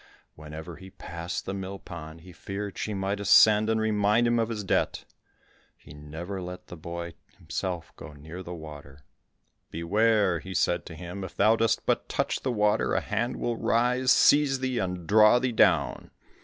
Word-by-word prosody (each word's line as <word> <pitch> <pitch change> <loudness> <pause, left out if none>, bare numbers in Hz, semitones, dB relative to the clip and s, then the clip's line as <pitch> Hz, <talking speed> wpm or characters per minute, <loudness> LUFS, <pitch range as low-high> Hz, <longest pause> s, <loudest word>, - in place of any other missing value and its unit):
Whenever 80 +2 -9
he 95 - -12
passed 85 -2 -6
the 95 - -4
mill 95 0 -5
pond, 80 -3 -10
he 90 +2 -13
feared 100 +4 -6
she 110 - -4
might 100 0 -2
ascend 105 +2 +6
and 110 0 +1
remind 105 +1 +2
him 120 0 +2
of 115 0 0
his 110 -3 -4
debt. 95 - -1 0.7
He - - -15
never 80 +6 -7
let 90 0 -8
the - - -10
boy 85 +1 -7 0.2
himself 90 -3 -5
go 75 - -10
near 80 +5 -9
the 90 - -9
water. 75 -3 -11 0.7
"Beware," 100 +2 +2
he 95 0 -8
said 85 0 0
to 80 - -9
him, 90 +4 -7
"if 95 - -8
thou 110 +3 +4
dost 115 0 0
but - - 0
touch - - -1
the 130 - -1
water, 105 -1 +1
a - - +3
hand 115 +4 -2
will 120 -1 -2
rise, 125 +2 +2
seize 145 -2 +4
thee, 130 -1 -1
and 90 -2 -3
draw 105 +4 +6
thee 125 0 0
down." 110 - +2
95 Hz, 180 wpm, -27 LUFS, 85-110 Hz, 0.7 s, ascend